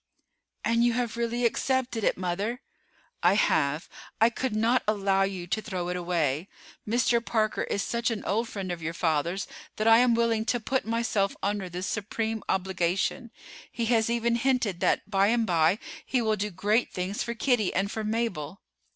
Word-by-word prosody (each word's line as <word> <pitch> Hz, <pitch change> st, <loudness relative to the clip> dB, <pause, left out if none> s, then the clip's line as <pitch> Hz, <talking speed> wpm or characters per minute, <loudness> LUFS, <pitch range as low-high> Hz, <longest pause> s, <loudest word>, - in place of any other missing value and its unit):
"And 230 Hz, +1 st, +3 dB
you 240 Hz, -1 st, +3 dB
have 240 Hz, -1 st, -1 dB
really 235 Hz, +1 st, -1 dB
accepted 250 Hz, -1 st, 0 dB
it, -, -, +2 dB
mother?" 195 Hz, +7 st, -2 dB, 0.6 s
"I 175 Hz, +3 st, +4 dB
have. 150 Hz, -6 st, +1 dB, 0.3 s
I 225 Hz, +2 st, +5 dB
could 250 Hz, -1 st, -2 dB
not 230 Hz, +4 st, +3 dB
allow 195 Hz, -2 st, +2 dB
you 195 Hz, -2 st, -1 dB
to 200 Hz, +5 st, -1 dB
throw 185 Hz, -5 st, -4 dB
it 180 Hz, -, -2 dB
away. 170 Hz, -3 st, -1 dB, 0.4 s
Mr. 235 Hz, 0 st, +2 dB
Parker 215 Hz, -2 st, 0 dB
is 200 Hz, -, -1 dB
such 235 Hz, 0 st, -1 dB
an 225 Hz, -3 st, -4 dB
old 225 Hz, +3 st, 0 dB
friend 190 Hz, -3 st, -4 dB
of 175 Hz, -1 st, -5 dB
your 165 Hz, +1 st, -4 dB
father's 170 Hz, +3 st, 0 dB, 0.3 s
that 215 Hz, -, -1 dB
I 225 Hz, 0 st, +8 dB
am 245 Hz, -1 st, +4 dB
willing 230 Hz, -1 st, +2 dB
to 245 Hz, -, +1 dB
put 260 Hz, +4 st, -1 dB
myself 225 Hz, -3 st, 0 dB
under 200 Hz, -2 st, -1 dB
this 180 Hz, +2 st, -4 dB
supreme 220 Hz, +2 st, -2 dB
obligation. 190 Hz, +4 st, 0 dB, 0.4 s
He 235 Hz, -, -2 dB
has 225 Hz, -1 st, +2 dB
even 235 Hz, 0 st, +1 dB
hinted 235 Hz, -7 st, +1 dB
that -, -, +1 dB
by 195 Hz, -1 st, +3 dB
and 230 Hz, +1 st, +2 dB
by 170 Hz, 0 st, +3 dB, 0.3 s
he 255 Hz, -, 0 dB
will 220 Hz, -2 st, +1 dB
do 210 Hz, +1 st, -2 dB
great 210 Hz, +6 st, +1 dB
things 185 Hz, +3 st, -3 dB
for 235 Hz, 0 st, -3 dB
Kitty 230 Hz, -5 st, +1 dB
and 195 Hz, +2 st, -1 dB
for 220 Hz, -, -3 dB
Mabel." 210 Hz, -7 st, -2 dB
215 Hz, 180 wpm, -27 LUFS, 185-235 Hz, 0.6 s, I